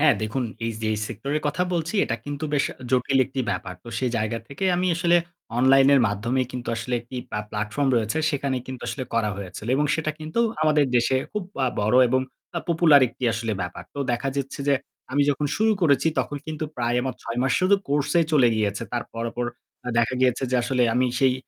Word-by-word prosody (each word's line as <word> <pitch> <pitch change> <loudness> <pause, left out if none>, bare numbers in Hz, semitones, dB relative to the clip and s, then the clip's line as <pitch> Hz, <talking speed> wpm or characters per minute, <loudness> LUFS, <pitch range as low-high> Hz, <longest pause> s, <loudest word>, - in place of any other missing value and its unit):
হ্যাঁ, 150 -1 +6
দেখুন 115 +4 -1 0.2
এই - - 0
যেই 110 0 0
সেক্টরের 140 +7 -3
কথা 150 +5 0
বলছি 165 +3 -2
এটা 115 - -2
কিন্তু 145 +1 -4
বেশ 145 - +2 0.3
জটিল 130 +1 +2
একটি 135 0 -4
ব্যাপার। 90 0 -4
তো - - -10
সেই 125 -2 0
জায়গা 110 +1 -1
থেকে 140 +8 -4
আমি 180 +1 +1
আসলে 175 0 +4 0.4
অনলাইনের 135 +2 +6
মাধ্যমেই 115 +5 0
কিন্তু 125 -1 -5
আসলে 115 +2 -2
একটি 120 +2 -10
প্লা 105 - -3
প্লাটফর্ম 110 +7 -1
রয়েছে। 115 +7 0
সেখানে 140 -2 -1
কিন্তু 130 -2 -7
আসলে 130 - -3
করা 110 -2 +1
হয়েছিল। 100 +1 -7
এবং 150 - +2
সেটা 160 -1 -1
কিন্তু 155 +9 -2 0.2
আমাদের 150 -2 +4
দেশে 120 +2 +3 0.2
খুব 210 -2 -2 0.2
আ - - +2
বড় 110 +4 +2
এবং 130 +2 +2 0.4
আ - - +2
popular 165 -4 +6
একটি 125 - -7
আসলে 115 0 -2
ব্যাপার। 90 0 -5
তো 140 - -7
দেখা 130 +3 -1
যাচ্ছে 140 0 -3
যে 140 - +5 0.4
আমি 145 - +3
যখন 145 +1 -1
শুরু 220 +1 +3
করেছি 140 -2 +3
তখন 145 - -1
কিন্তু 155 0 -3
প্রায় 120 0 0
আমার 130 -1 -2
৬ 115 +1 -4
মাস 135 - +1
শুধু 185 +2 +5
কোর্স 145 0 +1
এই 160 - +1
চলে 130 -5 +6
গিয়েছে। 105 0 -1
তারপর 115 -1 -4
পর 120 0 -1 0.5
দেখা 120 +2 +2
গিয়েছে 125 0 +2
যে 130 - +2
আসলে 125 0 +1
আমি 130 0 +3
সেই 130 -1 +4
130 Hz, 205 wpm, -24 LUFS, 115-145 Hz, 0.5 s, হ্যাঁ